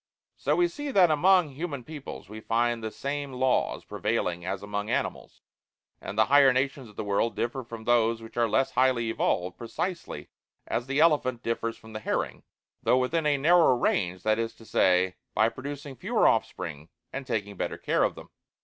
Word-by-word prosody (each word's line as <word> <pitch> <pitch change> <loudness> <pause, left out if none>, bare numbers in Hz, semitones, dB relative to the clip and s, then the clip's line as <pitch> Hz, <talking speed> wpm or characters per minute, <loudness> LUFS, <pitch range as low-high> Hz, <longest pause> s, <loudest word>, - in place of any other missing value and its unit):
So, - - 0
we 350 - +3
see, 290 -3 -6
that 185 - +5
among 180 +2 +4
human 140 -2 -5
peoples 140 - -9
we 110 +2 -8
find 115 +1 0
the 110 - -2
same 140 +5 -4
laws 130 0 0
prevailing 85 -1 -2
as 95 +2 -4
among 105 +1 -3
animals, - - -3 0.6
and 100 - -7
the 110 - +5
higher 140 -1 +6
nations 130 -1 -1
of 105 - -17
the 110 - -4
world 100 +2 0
differ 120 +4 -2
from 115 -1 -9
those 115 -1 +2
which 115 0 -12
are 115 -1 +2
less 135 +4 +2
highly 125 -3 +2
evolved 90 -4 -1
precisely 170 +10 -4 0.4
as 120 - -2
the 140 +2 0
elephant 145 -7 +3
differs 115 0 -2
from 110 0 -14
the 110 - -4
herring, - - -2 0.4
though 125 - +3
within 150 +5 +1
a 145 -1 +3
narrower 160 -2 +5
range, 90 -6 0
that 110 +1 +2
is 115 0 -2
to 115 - -16
say, 90 -3 +2 0.2
BY 110 +1 +4
PRODUCING 140 +2 -7
FEWER - - +2
OFFSPRING 80 -4 -1 0.2
AND 135 -1 -5
TAKING 105 -4 -2
BETTER - - -3
CARE - - 0
OF - - +1
THEM. - - -12
120 Hz, 185 wpm, -27 LUFS, 110-140 Hz, 0.6 s, higher